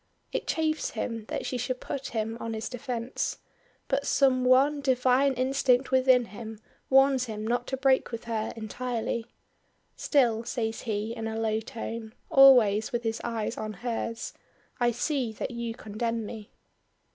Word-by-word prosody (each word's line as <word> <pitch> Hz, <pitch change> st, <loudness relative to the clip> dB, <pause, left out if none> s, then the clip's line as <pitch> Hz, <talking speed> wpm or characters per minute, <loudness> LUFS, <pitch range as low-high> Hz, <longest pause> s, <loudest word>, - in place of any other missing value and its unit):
It -, -, -2 dB
chafes 315 Hz, -1 st, 0 dB
him 225 Hz, -2 st, -4 dB
that -, -, -3 dB
she 250 Hz, -, -2 dB
should 250 Hz, +1 st, -2 dB
put 275 Hz, -, -5 dB
him 225 Hz, 0 st, -2 dB
on 225 Hz, -1 st, -4 dB
his 220 Hz, +1 st, -4 dB
defence; 245 Hz, -1 st, -3 dB, 0.5 s
but 280 Hz, +1 st, 0 dB
some 260 Hz, -2 st, +3 dB
one 270 Hz, +3 st, +4 dB
divine 260 Hz, +1 st, +3 dB
instinct 255 Hz, 0 st, +2 dB
within 255 Hz, -1 st, +5 dB
him 220 Hz, 0 st, -8 dB, 0.3 s
warns 270 Hz, -1 st, +5 dB
him 215 Hz, -2 st, -5 dB
not 240 Hz, +2 st, -1 dB
to 265 Hz, -, -2 dB
break 265 Hz, -1 st, +2 dB
with 230 Hz, -1 st, -5 dB
her 220 Hz, -2 st, -2 dB
entirely. 230 Hz, +1 st, -3 dB, 0.7 s
"Still," 235 Hz, -6 st, +2 dB
says 225 Hz, -2 st, -3 dB
he, 220 Hz, 0 st, -2 dB
in 225 Hz, -1 st, -4 dB
a 220 Hz, 0 st, -3 dB
low 220 Hz, -1 st, 0 dB
tone, 225 Hz, -1 st, -6 dB, 0.2 s
always 245 Hz, -5 st, +7 dB
with 240 Hz, -1 st, -2 dB
his 225 Hz, 0 st, -2 dB
eyes 230 Hz, -1 st, -2 dB
on 215 Hz, 0 st, -4 dB
hers, 230 Hz, -1 st, -3 dB, 0.5 s
"I 240 Hz, -1 st, +3 dB
see 245 Hz, +1 st, -1 dB
that 220 Hz, -, -4 dB
you 235 Hz, -1 st, -4 dB
condemn 230 Hz, +1 st, -3 dB
me." 210 Hz, -1 st, -8 dB
235 Hz, 155 wpm, -28 LUFS, 225-260 Hz, 0.7 s, always